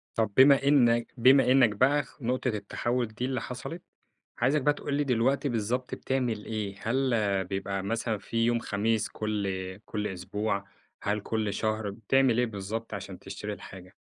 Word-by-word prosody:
طب 110 -2 +1
بما 135 +1 +7
إنّك 120 -5 +4
بما 130 +2 +6
إنّك 130 -3 +6
بقى 130 +8 +2 0.2
نُقطة 125 +2 -1
التحوّل 120 +2 -1
دي 110 +3 -4
اللي 130 -2 -2
حصلت، 130 +7 -6 0.6
عايزك 135 +5 +2
بقى 145 +2 +3
تقول 145 - -5
لي 145 +1 +2
دلوقتي 135 +2 +1
بالضبط 120 +2 -2
بتعمل 125 -5 -2
إيه؟ 105 -3 -3
هل 130 +2 +1 0.3
بيبقى 95 +1 -3
مثلًا 115 +1 -1
في 115 +3 -1
يوم 120 0 +2
خميس 110 0 0
كل 105 -2 -2 0.4
كل 105 -1 -3
أسبوع، 100 +2 -3 0.4
هل 105 +1 0
كل 105 0 -2
شهر؟ 110 0 -1
بتعمل 115 +4 +2
إيه 125 - +3
بالضبط 110 +1 -5
عشان - - -6
تشتري - - -6
الحاجة؟ 90 0 -11
115 Hz, 160 wpm, -28 LUFS, 105-130 Hz, 0.6 s, بما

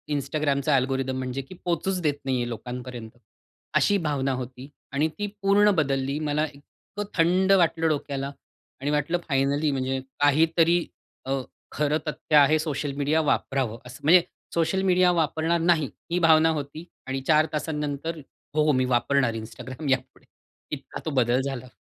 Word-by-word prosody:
Instagramचा 140 0 0
algorithm 130 0 0
म्हणजे 130 +1 -3
की 180 +8 -12
पोहचूच 180 +2 0
देत 150 -3 +2
नाही 130 -1 +1
आहे 120 0 -1
लोकांपर्यंत, 125 0 -7 0.7
अशी 205 - +4
भावना 140 -2 0
होती. 130 +2 -9 0.2
आणि 145 +3 +1
ती 205 - -1
पूर्ण 205 +1 +5
बदलली. 140 -2 0
मला 150 0 0
इतकं 200 +8 -10
थंड 180 +3 +3
वाटलं 165 -3 +3
डोक्याला 140 -2 -2 0.5
आणि 145 - -1
वाटलं 150 +4 +1
फायनली 140 +1 +1
म्हणजे 130 -1 -1 0.2
काहीतरी 165 +4 +3 0.4
अ, 135 0 -1 0.3
खरं 150 +1 +1
तथ्य 150 0 -1
आहे. 150 +2 +6
सोशल 150 -2 -2
मीडिया 150 +3 +2
वापरावं 130 -5 -1
असं. 125 - -10
म्हणजे 175 +4 +7 0.3
सोशल 170 +3 +1
मीडिया 180 0 +5
वापरणार 165 0 +1
नाही 165 -5 +2 0.2
ही 180 - +2
भावना 160 0 +6
होती 145 +3 -6 0.2
आणि 135 0 -2
4 155 -1 +5
तासानंतर 150 +1 -3 0.4
हो 155 - +4
हो 155 - +4
मी 130 -2 +2
वापरणार 125 0 +2
Instagram 130 +6 -7
यापुढे. 130 - -2 0.5
इतका - - -6
तो 160 - -2
बदल 125 -1 +2
झाला. 130 -2 -4
145 Hz, 150 wpm, -25 LUFS, 135-160 Hz, 0.7 s, म्हणजे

